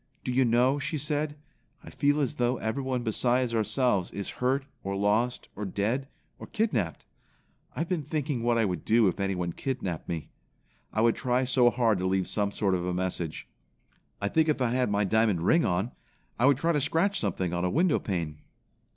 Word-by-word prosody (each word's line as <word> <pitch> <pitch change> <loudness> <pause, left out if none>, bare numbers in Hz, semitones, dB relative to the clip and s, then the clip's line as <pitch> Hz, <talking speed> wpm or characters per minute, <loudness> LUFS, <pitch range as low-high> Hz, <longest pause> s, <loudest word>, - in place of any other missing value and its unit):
"Do - - -2
you 130 +1 +3
know," 125 +4 +3
she 145 +3 -2
said, 150 +1 -2 0.5
"I - - -11
feel 145 +1 +2
as 135 - -1
though 120 +1 +1
everyone 125 +2 -2
besides 120 +2 +1
ourselves 110 -3 +1
is 100 - -5
hurt 135 +2 +1 0.2
or 100 0 -3
lost 105 +5 +1
or 105 - -5
dead 110 +7 -1 0.3
or - - -9
kidnapped? 130 - -1 0.7
I - - -2
have 165 - -3
been 180 -4 0
thinking 145 -3 -2
what 120 0 +2
I 115 - +3
would 90 -5 -3
do 115 -1 +4
if 95 - -1
anyone 90 -3 -1
kidnapped 110 - -4
me. 80 -3 -4 0.6
I 110 - 0
would 115 0 +4
try 125 +1 +1
so 125 -1 +4
hard 115 -5 +1
to 95 - 0
leave 95 0 +1
some 100 -1 0
sort 100 -2 0
of 90 -1 0
a 90 0 -2
message. 90 -3 -3 0.7
I 100 - -1
think 160 +8 +2
if 150 - +1
I 125 -2 +1
had 125 -2 +1
my 105 0 +1
diamond 105 -3 +2
ring 165 - +4
on, 90 +7 0 0.5
I 125 - +5
would 140 -2 +5
try 165 +4 +1
to 150 -3 +1
scratch 170 +7 +1
something 95 -4 -2
on 85 0 -1
a 90 - +1
window 165 - +2
pane." 80 -6 -3
120 Hz, 200 wpm, -28 LUFS, 100-135 Hz, 0.7 s, I